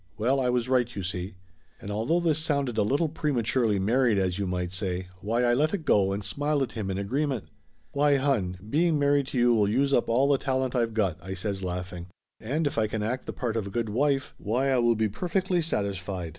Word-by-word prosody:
Well, 125 +5 +2
I 125 -1 +1
was 125 -1 0
right, 125 -2 +1
you 100 - -4
see!" 90 +1 -4 0.4
And 100 - -7
although 115 +12 +1
this 160 -3 +2
sounded 140 -6 0
a 110 - +2
little 140 +10 +1
prematurely 125 -7 0
mar 115 +7 +2
ried 110 -4 +3
as 95 -1 0
you 100 - -1
might 90 -1 -2
say, 95 -1 -3
why 115 +6 0
I 120 0 +3
let 155 +9 +2
it 165 -6 -7
go 100 -8 +3
and 100 +1 -3
smiled 145 +7 0
at 130 - -4
him 105 -4 -4
in 95 - -2
agreement. 130 +4 -2 0.4
"Why, 145 0 +3
hon, 125 -10 0
being 160 +6 +2
married 145 -1 +2
to 135 - -4
you 120 0 +4
will 105 -3 +3
use 140 +5 +1
up 120 - +2
all 130 +4 +3
the 140 -2 +3
talent 130 -2 -1
I've 115 -2 0
got!" 95 -7 0
I 95 +2 -6
says, 95 +1 -3
laughing. 90 -1 -5 0.3
"And 145 +8 -1
if 140 -5 0
I 110 - +2
can 105 0 -3
act 125 +4 -3
the - - -2
part 120 -3 -3
of 110 -3 -2
a - - -5
good 115 +2 -2
wife, 135 +4 0
why 125 +6 0
I 130 - +3
will 120 -1 +3
be 110 0 +1
perfectly 180 - -1
satis 100 - -1
fied. 90 -2 -5
120 Hz, 240 wpm, -27 LUFS, 100-140 Hz, 0.4 s, you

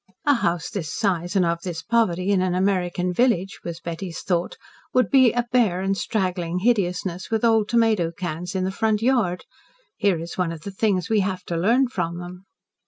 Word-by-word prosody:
"A 290 - +5
house 175 -9 -1
this 165 -7 -4
size 180 -4 -1
and 185 -2 +4
of 170 0 -1
this 170 -3 -5
poverty 195 -5 +1
in 195 -2 +3
an 185 -1 0
American 180 -1 0
village," 200 -4 +1
was 170 -1 -5
Betty's 170 0 -6
thought, 175 -2 -1 0.4
"would 255 - +3
be 260 -4 +6
a 240 -1 -1
bare 215 -8 +2
and 195 +1 0
straggling 180 -5 -1
hideousness, 185 -4 0
with 225 +1 +1
old 225 -2 +3
tomato 225 -7 +2
cans 175 +2 -5
in 185 - 0
the 190 - -1
front 220 +1 0
yard. 230 -9 +1 0.5
Here 195 -5 +2
is 170 +2 -7
one 175 -2 +1
of 165 -2 -8
the 200 - -6
things 190 -3 0
we 220 -2 +2
have 185 -2 -2
to 175 - -4
learn 235 +10 +3
from 170 -9 -3
them." 180 +2 -9
185 Hz, 195 wpm, -23 LUFS, 175-220 Hz, 0.5 s, be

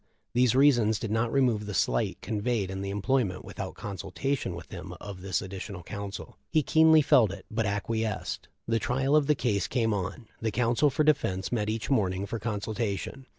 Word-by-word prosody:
These 125 0 +3
reasons 120 -6 +5
did 110 - -4
not 115 +1 +1
remove 120 -6 +2
the 105 - -4
slight - - +1
conveyed 105 -2 -1
in 95 0 -4
the 100 - -3
employment 100 -1 0
without - - -6
consultation 100 +2 -3
with 85 - -10
him - - -7
of 100 -3 -8
this 95 -2 -1
additional 95 -1 -7
counsel. 100 +2 -7
He 155 -2 +2
keenly 160 0 +6
felt 115 -7 +5
it, 100 -1 -9
but 110 -1 0
acquiesced. 110 +1 -2 0.2
The 115 0 +2
trial 135 +6 +1
of 150 -2 +4
the 150 - +4
case 105 -9 0
came 115 -3 +1
on; 100 +4 -3 0.2
the 110 - 0
counsel 120 +6 +2
for 140 +3 +1
defense 100 -11 +1
met 110 -3 0
each 110 +5 -2
morning 95 -6 +1
for 110 +3 -4
consultation. 110 +3 -3
110 Hz, 185 wpm, -28 LUFS, 100-125 Hz, 0.2 s, keenly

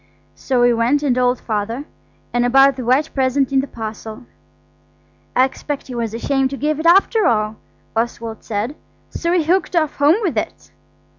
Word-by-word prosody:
So 255 -2 -1
we 245 0 +5
went 240 +6 +1
and 275 -4 +2
told 250 0 +1
Father, 225 +5 -3 0.5
and 240 0 +2
about 270 +2 +5
the 255 - -5
white 265 +6 +1
present 265 0 +1
in 270 - +3
the 275 - -6
parcel. 220 0 -7 1.1
"I 255 - +5
expect 280 +2 -5
he 255 - -9
was 230 -2 -3
ashamed 270 +2 0
to 275 - -5
give 300 +1 -1
it 325 - 0
after 390 +4 +4
all," 215 -1 0 0.4
Oswald 230 -1 -3
said, 220 +6 -3 0.4
"so 340 - -2
he 350 -2 +2
hooked 355 +2 0
off 310 -3 +1
home 290 +3 +5
with 355 - +1
it." - - -8
260 Hz, 175 wpm, -19 LUFS, 230-290 Hz, 1.1 s, we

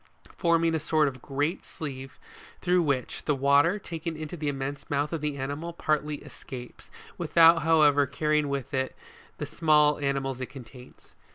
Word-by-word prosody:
forming 165 -1 +2
a 160 - +1
sort 155 0 +2
of 130 -3 -5
great 145 +6 -2
sieve 135 -4 -7 0.4
through 180 0 +2
which, 140 -6 -2
the 150 - +2
water, 140 +7 +4
taken 165 -4 -5
into 155 +2 -6
the 150 -3 -4
immense 140 0 -4
mouth 145 +2 -1
of 165 - -2
the 150 -2 -2
animal, 145 +5 -4
partly 150 -2 -1
escapes, 125 -2 -10 0.3
without 165 0 +6
however 150 -3 +4
carrying 150 +2 0
with 140 0 -4
it 130 0 -1 0.4
the - - -4
small 150 -2 +3
animals 135 -2 -2
it 130 - -3
contains, 125 -1 -13
47. - - -36
145 Hz, 165 wpm, -27 LUFS, 135-160 Hz, 0.4 s, without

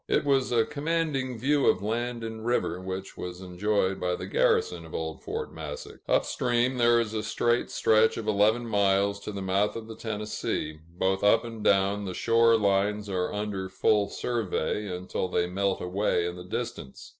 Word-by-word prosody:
It - - +1
was 135 -3 +2
a 115 -2 +3
commanding 150 -4 -1
view 140 +4 +2
of - - +3
land 120 +2 -2
and 110 -1 -6
river, 120 -6 0
which 95 +1 -6
was 90 0 -6
enjoyed 95 +1 0
by 90 0 0
the - - -6
garrison 85 -2 +1
of 80 - -9
old 80 -1 -4
Fort - - -5
Massac. 75 -2 -7
Up - - +3
stream, 120 +1 0
there 120 0 +5
is 110 -2 -2
a 110 - -1
straight 120 +2 0
stretch 110 0 +3
of 110 -2 -5
eleven 110 +3 +3
miles 100 -1 +2
to 105 - -6
the 100 -1 -5
mouth 100 +2 +1
of 115 -1 -6
the 110 - -8
Tennessee; 105 -8 -3 0.2
both 95 +1 +1
up 105 +2 +5
and 115 -2 -7
down, 100 +1 +2
the 90 -2 -4
shore 115 0 +4
lines 100 0 +1
are 90 -2 -1
under 105 -2 -3
full 100 +2 +2
survey, 105 -3 -2
until 90 0 -3
they 90 -1 +1
melt 95 +2 -1
away 90 -1 0
in 85 0 -3
the 90 0 -9
distance. 115 - -6
105 Hz, 185 wpm, -27 LUFS, 95-115 Hz, 0.2 s, there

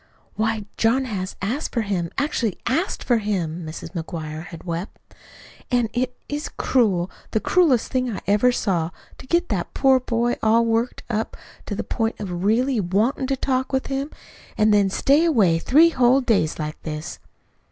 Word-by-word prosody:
"Why, 220 -1 -1
John 255 +4 +2
has 195 -6 -4
asked 250 +10 -2
for 230 - +1
him, 185 -5 -2
actually 260 - 0
ASKED 320 +10 -1
for 240 -3 +2
him," 180 -6 -2
Mrs. 160 +1 -7
McGuire 160 -2 -5
had 165 -2 -10
wept. 170 +2 -5 0.7
"An' 245 -3 +2
it 250 +1 -1
is 295 +1 -4
cruel, 195 -8 +1 0.2
the 220 - 0
cruelest 285 -5 +2
thing 255 -1 0
I 210 - -4
ever 210 +5 +4
saw, 180 -9 0 0.3
to - - -12
get 345 +3 +1
that 195 -6 -3
poor 265 -1 +4
boy 240 -1 0
all 225 +1 +4
worked 230 +2 0
up 220 -1 -2 0.3
to 205 - -3
the - - -3
point 225 -1 -2
of 180 -4 -4
really 240 +4 +2
WANTIN' 210 +9 0
to 270 0 0
talk 260 0 -1
with 265 -1 0
him, 275 +2 -2 0.5
an' 215 0 +4
then 205 -2 +4
stay 280 - +3
away 210 - +3
three 310 - +5
whole 255 -2 +4
days 210 -11 +1
like 155 0 -5
this!" 155 +1 -6
225 Hz, 175 wpm, -23 LUFS, 185-255 Hz, 0.7 s, three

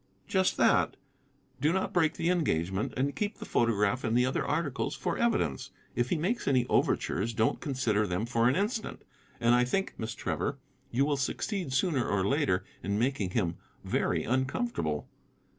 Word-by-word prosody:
"Just 190 -1 +2
that. - - +3 0.6
Do 150 - +3
not 190 +2 -1
break 160 -3 +3
the 170 - +1
engagement, 95 - 0
and 140 +2 0
keep 210 0 -2
the - - -7
photograph 115 +1 +1
and 115 0 +1
other 130 - 0
articles 145 -2 -1
for 175 - -2
evidence. 215 - 0 0.3
If 120 0 0
he - - +1
makes 195 +10 -1
any 130 -3 +3
overtures, 110 +6 +1
don't 110 0 +1
consider 115 -8 0
them 90 +4 -1
for 115 0 +2
an 130 - +1
instant. 215 +4 -2 0.4
And 120 0 +4
I 125 0 +5
think, 190 +11 -1
Miss 110 +1 -4
Trevor, 140 +2 -2 0.3
you 135 +4 +2
will 145 -1 +1
succeed 175 +4 -2
sooner 130 -1 +1
or 95 -2 +1
later 140 -10 +1 0.2
in 100 +3 -1
making 120 -5 0
him 90 -4 -1 0.3
very - - 0
uncomfortable. 130 - -1
130 Hz, 165 wpm, -30 LUFS, 110-160 Hz, 0.6 s, I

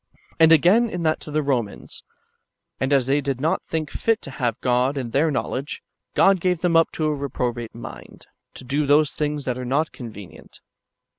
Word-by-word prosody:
^ - - -31 0.2
And 160 0 +7
again, 185 +9 +5
in 175 -4 -4
that 155 -1 +1
to - - -10
the 155 +1 0
Komans: 125 -7 -2
^' - - -52 0.8
And 130 +1 -1
as 135 -3 +3
they 140 +3 +1
did 135 -2 -2
not 160 +6 0
think 155 -2 -3
fit 225 -1 0
to 140 - -8
have 120 -4 -2
God 125 +3 +1
in 125 -4 -4
their 150 +6 +2
knowledge, 140 0 -3 0.3
God 195 -1 +5
gave 180 -2 0
them 175 -2 +1
up 165 0 +5
to 155 - -2
a 155 - +1
reprobate 125 -5 -3
mind, 115 - -10 0.3
to - - -8
do 140 +3 -1
those 145 0 +4
things 150 -2 -2
that 125 -1 -2
are - - -4
not 140 +6 0
convenient." 110 - -11
145 Hz, 205 wpm, -23 LUFS, 130-160 Hz, 0.8 s, And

